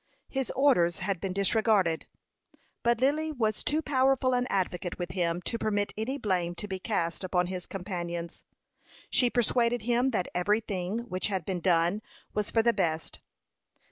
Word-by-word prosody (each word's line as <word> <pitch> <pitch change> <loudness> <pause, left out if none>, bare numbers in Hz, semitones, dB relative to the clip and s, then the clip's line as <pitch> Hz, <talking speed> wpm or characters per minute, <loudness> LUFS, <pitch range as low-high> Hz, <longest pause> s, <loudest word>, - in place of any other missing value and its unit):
His 265 -2 -1
orders 200 -12 +4
had 190 -1 -2
been 195 - -2
disregarded; 200 -3 +2 0.7
but 235 -1 +2
Lily 300 +4 +2
was 220 -7 0
too 310 +2 0
powerful 265 -2 +2
an 250 0 +1
advocate 180 -2 -1
with 175 0 -4
him 175 -1 -1
to 230 - -3
permit 205 -2 0
any 235 +6 -2
blame 180 -7 -1
to 210 - -4
be 190 -1 -4
cast 180 -4 -1
upon 180 -1 +1
his 180 0 -5
companions. 175 -3 -5 0.7
She 245 - +4
persuaded 240 -1 +2
him 245 +3 +2
that 205 -8 -1
every 205 +5 +2
thing 200 0 -3
which 185 -4 -1
had 190 -5 -2
been 185 -2 -2
done 175 +3 +2 0.3
was 210 -1 -1
for 225 - +2
the 235 0 +4
best. 165 -5 -1
200 Hz, 165 wpm, -29 LUFS, 180-235 Hz, 0.7 s, orders